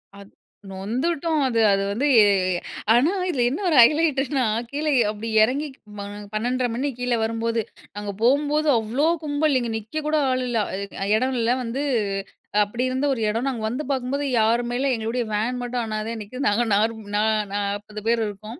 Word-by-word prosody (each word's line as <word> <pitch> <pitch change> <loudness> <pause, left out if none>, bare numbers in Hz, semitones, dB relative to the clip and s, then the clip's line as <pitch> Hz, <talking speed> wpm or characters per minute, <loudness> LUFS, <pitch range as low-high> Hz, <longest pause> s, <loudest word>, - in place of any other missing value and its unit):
அத் 200 0 -14 0.4
நொந்துட்டோம் 280 - -1
அது 230 -3 0
அது 195 0 +2
வந்து, 250 +8 0
ஏ 215 - +8 0.7
ஆனா 255 +8 +4 0.2
இதில 255 -8 +1
என்ன 285 +9 -3
ஒரு 320 - +2
ஹைலைட்டுனா 280 -1 +3 0.3
கீழ 295 +2 -3
எ - - +5
அப்படி 215 +1 -7 0.2
இறங்கி 275 +7 0 0.3
ம - - -7 0.3
12:30 245 +3 0
மணி 270 +4 -1
கீழ 245 0 -2
வரும்போது. 230 +1 -1 0.3
நாங்க 205 0 -4
போம்போது 290 +5 +2
அவ்ளோ 230 +7 0 0.2
கும்பல், 290 -1 +1
இங்க 240 - -3
நிக்க 220 +9 -5
கூட 310 0 +2
ஆள் 255 0 0
இல்ல. 240 -1 -1 0.2
அதுக்கு 200 +1 -6
அ - - -1
இடம் 260 +3 0
இல்ல 230 +1 +2
வந்து 245 +4 -3 0.8
அப்படி 235 +5 -3
இருந்த 260 +2 -1
ஒரு 240 - -4
இடம், 230 +5 -1
நாங்க 235 -4 -4
வந்து 255 +6 -3
பார்க்கும்போது 270 +2 -1
யாருமே 235 +2 +1
இல்ல, 275 - +1
எங்களுடைய 230 +2 -2
வேன் 235 +4 -1
மட்டும் 245 0 -2
அனாதையா 220 +1 -4
நிக்குது, 255 +6 -5
நாங்க 225 +4 +2
நா 215 -1 0 0.3
நாப்பது 205 +1 -3
பேர் 230 -1 +2
இருக்கோம். 215 +5 -9
240 Hz, 170 wpm, -23 LUFS, 220-275 Hz, 0.8 s, ஏ